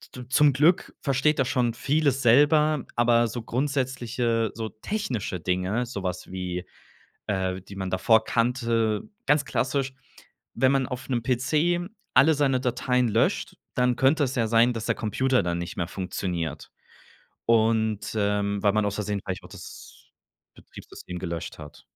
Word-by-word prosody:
d 125 -1 -9
zum 145 +1 +5
Glück 155 +7 +2
versteht 140 +2 +1
er 135 - +3
schon 125 -3 0
vieles 140 +1 +1
selber, 150 +4 +4
aber 120 0 +3
so 120 +1 -5
grundsätzliche 125 -3 -1
so 110 -1 -5
technische 115 - -4
Dinge, 95 +7 -1
so 100 -6 -6
was 90 0 -4
wie, 90 -1 -4 0.6
äh, 95 -2 -1
die 100 +1 -12
man 95 -1 -4
davor 110 +4 +3
kannte 115 -2 0 0.2
ganz 145 +1 +3
klassisch, 135 0 -1 0.6
wenn 130 +2 +3
man 135 -1 +2
auf 125 0 -7
'nen 120 -3 -1
PC 155 +7 +1 0.3
alle 160 +2 +6
seine 135 -3 +1
Dateien 125 -1 +1
löscht, 110 +2 0 0.2
dann 125 -1 +2
könnte 140 +3 +3
es 130 0 -3
ja 115 -2 +2
sein, 115 +2 +4
dass 115 -1 -5
der - - +1
Computer 130 +2 +1
dann 85 0 -2
nicht 85 - -6
mehr 85 -1 -2
funktioniert. 90 -4 -4 0.7
Und, 110 -2 +1
ähm 100 -1 0
weil 100 -1 +4
man 105 -1 +1
ausversehen 100 0 -2
vielleicht 95 -1 -4
auch - - -11
das - - -12 0.4
Betriebssystem 90 0 -10
gelöscht 85 -3 -5
hat. 75 -1 -12
115 Hz, 155 wpm, -26 LUFS, 100-130 Hz, 0.7 s, alle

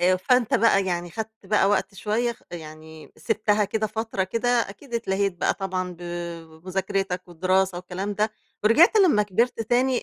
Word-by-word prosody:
آآ، 185 +1 +4
فأنت 245 +5 +2
بقى 195 -3 +4
يعني 175 -1 -2
خدت 220 +5 -5 0.2
بقى 210 -2 +3
وقت 200 0 0
شوية 220 +5 -1
خ - - -22
يعني 155 -1 -10
سِبتها 210 -2 +1
كده 215 +2 -1
فترة 220 -2 -2
كده 230 +6 -2
أكيد 240 +1 -1
اتلاهيت 200 -4 0
بقى - - +1
طبعًا 185 -1 -3
ب - - -14 0.7
بمذاكرتك 190 0 -2
والدراسة 185 +1 +1
والكلام 185 +3 -4
ده، 215 +2 +1 0.3
ورجعت 310 - +6
لمّا 360 - +5
كبرت 230 +5 0
تاني 245 +3 +1
200 Hz, 160 wpm, -24 LUFS, 185-225 Hz, 0.7 s, ورجعت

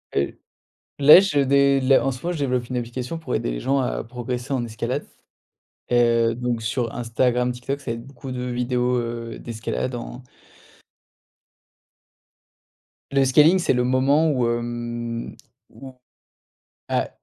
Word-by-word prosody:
Heu, 70 - -1 0.6
là 150 +5 +9
je 175 -7 +1
dé 140 0 +3
les 130 +1 +5
en 135 - 0
ce 130 -1 -8
moment, 175 - -1
je 170 - -5
développe 125 -4 -1
une 130 - -2
application 125 +6 -5
pour 150 -6 -5
aider - - -1
les - - -4
gens 140 +1 +1
à 125 - -2
progresser 125 +2 -5
en 125 -3 -1
escalade. 110 -2 -4 0.9
Heu, 115 -1 +3
donc 120 -1 -2
sur 115 +2 -2
Instagram, 125 +1 0
TikTok, 135 +3 -5
ça 125 -4 -4
va - - -4
être 120 - -12
beaucoup 135 -1 -9
de 125 0 -4
vidéos, 125 0 0
heu, 115 -1 -5
d'escalade 120 +2 -4
en 120 +1 -7 2.9
Le 135 -1 +3
scaling, 150 +7 +5
c'est 180 - +1
le 125 0 +1
moment 135 +5 +3
où, 125 -4 +1
hem, 120 0 -4 0.4
où, 130 -1 -12 1.0
à - - 0
125 Hz, 150 wpm, -23 LUFS, 120-135 Hz, 2.9 s, là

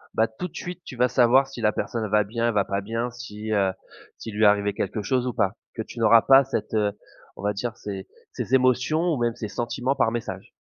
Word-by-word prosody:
Bah 110 - +3
tout 110 +12 -6
de - - -20
suite 180 0 -6
tu 130 - -9
vas 125 +1 +2
savoir 130 +2 +4
si 130 -3 -9
la 105 - +3
personne 115 -2 -3
elle - - -5
va 105 0 +3
bien, 115 +3 -2
elle 115 - +1
va 100 -1 +2
pas 100 0 -2
bien, 115 +4 -3
si 110 -3 -7
heu, 100 -2 +2 0.5
s'il 110 - -8
lui 110 - +1
est - - +8
arrivé 100 0 +3
quelque 105 +1 -3
chose 125 +4 0
ou 125 - -2
pas. 100 -5 +1 0.2
Que 110 - -3
tu 120 - -10
n'auras 115 0 +6
pas 135 0 +7
cette, 135 -3 -4
heu, 105 -2 +2 0.4
on 95 - -10
va 105 - +1
dire 110 +3 -4
ses 95 -2 -6 0.2
ses 130 - 0
émotions 130 +4 +2
ou 145 - -1
même 120 0 +1
ses 110 -3 -5
sentiments 125 +2 -1
par 115 -4 +2
message. 120 -1 -5
115 Hz, 255 wpm, -25 LUFS, 105-125 Hz, 0.5 s, est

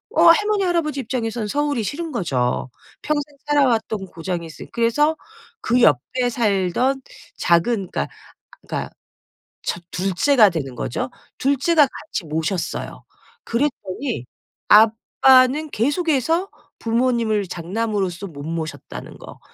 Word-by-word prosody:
어 - - +5
할머니, 415 +4 +5
할아버지 335 -5 0
입장에서는 230 -3 -3
서울이 290 0 0
싫은 320 - -4
거죠. 130 - -1 0.3
평생 295 -1 -2
살아왔던 230 -8 +1
고장이 170 0 -4
있으 160 - -10
그래서 240 +7 +2 0.5
그 245 +2 +2
옆에 240 - +3
살던 230 +3 +1 0.4
작은 180 +3 +2
그러니까, 70 - -1 0.6
그러니까 - - -3 0.7
첫 175 - -3
2 190 +2 -1
째가 230 0 +5
되는 140 -7 -4
거죠. 125 +1 -3 0.3
2 280 +2 +2
째가 310 +1 +4
같이 260 - -6
모셨어요. 160 +4 -3 0.4
그랬더니 235 - -2 0.4
아빠는 255 +6 +5
계속해서 320 - +1 0.3
부모님을 230 -3 +1
장남으로서 195 +1 -2
못 145 -4 -9
모셨다는 160 0 -6
거 - - -12
230 Hz, 275 characters per minute, -21 LUFS, 185-285 Hz, 0.7 s, 어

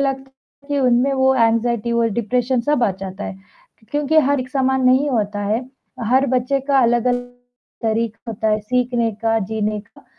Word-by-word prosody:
बालक 270 -1 -1 0.4
के 285 -1 0
मन 250 -1 +4
में 275 0 +1
वो 265 0 +3
एंग्ज़ायटी 235 -1 +1
और 235 -1 +2
डिप्रेशन 245 +2 0
सब 275 0 0
आ 205 - +3
जाता 190 +1 -6
है 190 - -6 0.5
क्योंकि 295 +2 +2
हर 285 -2 +2
एक 255 - -6
समान 265 -1 +1
नहीं 260 +3 +4
होता 205 -3 -1
है, 215 +4 0 0.5
हर 260 +4 +3
बच्चे 255 +2 +1
का 275 -1 +4
अलग 240 -1 +2
अलग 245 0 0 0.5
तरीका 225 +1 -2
होता 220 0 -2
है 215 0 +1
सीखने 240 0 0
का, 225 0 +2
जीने 215 0 -2
का। 220 +2 -21
240 Hz, 185 wpm, -20 LUFS, 220-265 Hz, 0.5 s, मन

